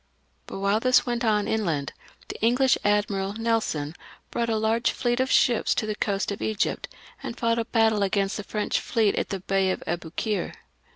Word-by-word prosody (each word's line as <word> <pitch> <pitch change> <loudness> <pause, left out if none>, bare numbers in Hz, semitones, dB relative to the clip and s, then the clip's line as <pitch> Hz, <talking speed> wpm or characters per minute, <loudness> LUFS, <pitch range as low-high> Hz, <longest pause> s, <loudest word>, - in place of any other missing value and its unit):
But - - -6
while 200 +2 +1
this 255 +2 +4
went 240 -1 -2
on 210 -2 +2
inland, 165 -10 -1 0.3
the - - -8
English 250 +4 +4
admiral. 205 -1 +1
Nelson, 220 -9 -1 0.4
brought 235 -1 -1
a 220 - +1
large 220 +2 +1
fleet 240 -1 -1
of 260 0 +1
ships 240 -4 +3
to - - 0
the 215 - -1
coast 200 -1 -1
of 200 - -5
Egypt, 220 -2 -1 0.3
and 235 - -6
fought 230 0 +1
a 230 - -1
battle 220 -3 +2
against 195 0 0
the 210 - -5
French 210 +1 -1
fleet 220 -4 +1
in - - -1
the 195 -2 -4
Bay 195 0 +1
of 185 - -2
Aboukir. 175 +5 -3
215 Hz, 185 wpm, -25 LUFS, 195-230 Hz, 0.4 s, this